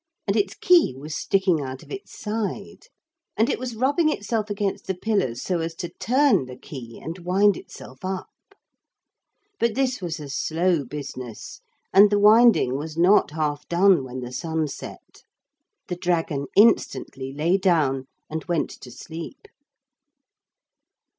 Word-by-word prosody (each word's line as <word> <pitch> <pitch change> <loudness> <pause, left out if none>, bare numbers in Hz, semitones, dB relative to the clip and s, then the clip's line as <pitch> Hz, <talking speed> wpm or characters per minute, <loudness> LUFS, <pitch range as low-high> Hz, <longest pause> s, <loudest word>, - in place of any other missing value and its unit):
And 195 - 0
its 205 -1 0
key 350 - +4
was 150 +3 -6
sticking 190 -5 +1
out 130 -1 -6
of - - -17
its 400 0 -8
side. 215 - -4 0.5
And 225 - +3
it - - -2
was 250 -2 -5
rubbing 285 +7 +2
itself 215 -5 -2
against 200 -1 -2
the 190 - -1
pillars 180 - -1
so 180 -2 -1
as 165 0 -3
to 175 0 -5
turn 260 - +3
the 125 - -9
key 120 -5 -10
and 165 +5 -7
wind 190 +3 +3
itself 130 +5 -12
up. 185 0 -3 1.3
But 235 -2 +1
this 260 -4 0
was 170 -3 -4
a 150 - -7
slow 160 +3 0
business 130 -4 -8 0.3
and 200 +2 +8
the 205 - +2
winding 210 - +5
was 155 +1 -7
not 185 +5 +5
half 150 -1 -3
done 180 -3 +4
when 130 0 -6
the 125 0 -6
sun 160 +1 -2
set. - - -10 0.7
The 180 - -4
dragon 165 -5 -1
instantly 185 -10 +2
lay 160 +7 +1
down 145 -8 +1 0.2
and 160 0 -5
went 170 -3 -1
to 125 - -10
sleep. 165 - -9
175 Hz, 150 wpm, -24 LUFS, 145-210 Hz, 1.3 s, and